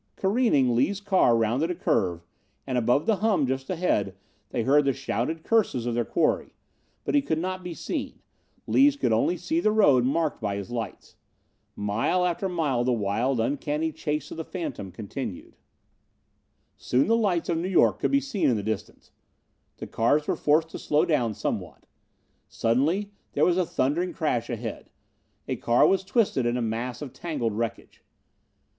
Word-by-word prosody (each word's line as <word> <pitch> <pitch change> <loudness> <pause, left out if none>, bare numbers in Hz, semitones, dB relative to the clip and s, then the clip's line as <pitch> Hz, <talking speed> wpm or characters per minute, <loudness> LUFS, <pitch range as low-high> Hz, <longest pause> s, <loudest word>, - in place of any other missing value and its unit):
Careening, 190 - +2
Lees' 185 +12 +1
car 190 - +3
rounded 120 +9 +1
a 180 - -2
curve, 85 - 0 0.4
and, 130 - -3
above 125 +4 +2
the 220 -3 +2
hum 205 -9 +2
just 130 +1 -3
ahead, 160 - 0 0.3
they 120 - -1
heard 145 +4 +4
the 135 - +2
shouted 160 +8 -3
curses 200 - +1
of 120 - -1
their 120 0 +1
quarry. 155 +7 0 0.5
But - - -2
he 290 - +4
could 160 - -1
not 185 +2 -3
be 175 -2 -6
seen. - - -4 0.5
Lees 280 +1 +4
could 120 - +1
only 170 +11 +2
see 320 - -1
the 215 - +2
road 145 - +5
marked 150 +3 0
by 100 -2 -1
his 100 +3 -6
lights. 115 -2 -6 0.6
Mile 115 - 0
after 180 +2 -1
mile 150 -9 0
the 125 - +1
wild, 115 +3 0
uncanny 145 +6 -1
chase 150 -1 -3
of - - -7
the 160 - -3
phantom 150 - -6
continued. 105 +1 -7 1.2
Soon 125 +2 +1
the 225 - +4
lights 195 -7 +1
of 165 -1 0
New 180 +3 -2
York 190 - +3
could - - +1
be 275 - +3
seen 275 - 0
in 120 - +2
the 105 - -3
distance. 110 +1 -5 0.7
The - - -6
cars 145 +7 +1
were - - +1
forced 155 +2 +2
to - - -7
slow 150 +1 +2
down 120 -9 0
somewhat. - - -4 0.6
Suddenly 155 - 0 0.2
there - - +3
was 175 - +3
a 180 - +1
thundering 170 +7 0
crash 150 -9 -1
ahead. 115 -2 -5 0.6
A - - -2
car 120 +1 +3
was 190 0 +3
twisted 190 - +1
in 120 +1 0
a - - -1
mass 115 +3 -3
of 135 - -8
tangled 140 -10 -3
wreckage. 115 +1 -5
145 Hz, 175 wpm, -26 LUFS, 120-180 Hz, 1.2 s, road